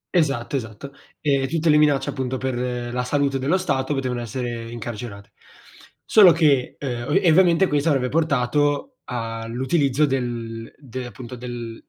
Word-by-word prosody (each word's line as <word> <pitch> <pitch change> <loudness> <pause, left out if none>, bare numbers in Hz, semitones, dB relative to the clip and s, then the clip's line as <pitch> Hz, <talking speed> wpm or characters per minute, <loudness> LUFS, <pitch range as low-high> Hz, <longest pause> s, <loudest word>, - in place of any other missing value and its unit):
Esatto, 140 -6 +1
esatto. 125 +2 -6 0.3
E 140 -3 +1
tutte 165 +2 0
le 150 - +6
minacce, 150 -2 +3
appunto, 130 0 -3
per 125 -1 -3
la 125 0 -1
salute 140 +1 0
dello 145 +8 +1
Stato 145 -6 -1
potevano 125 -2 -2
essere 120 0 -5
incarcerate. 110 -3 -7 0.7
Solo 200 -5 +7
che, 145 -6 +2
uhm 130 +4 -1
e 175 -5 +4
ovviamente 180 +2 +5
questo 145 +2 +1
avrebbe 130 -4 +1
portato 145 - 0
all'utilizzo 125 +5 0
del 120 -4 -3
de 130 -2 -7
appunto, 120 +3 -9
del 120 -2 -7
130 Hz, 140 wpm, -22 LUFS, 120-145 Hz, 0.7 s, Solo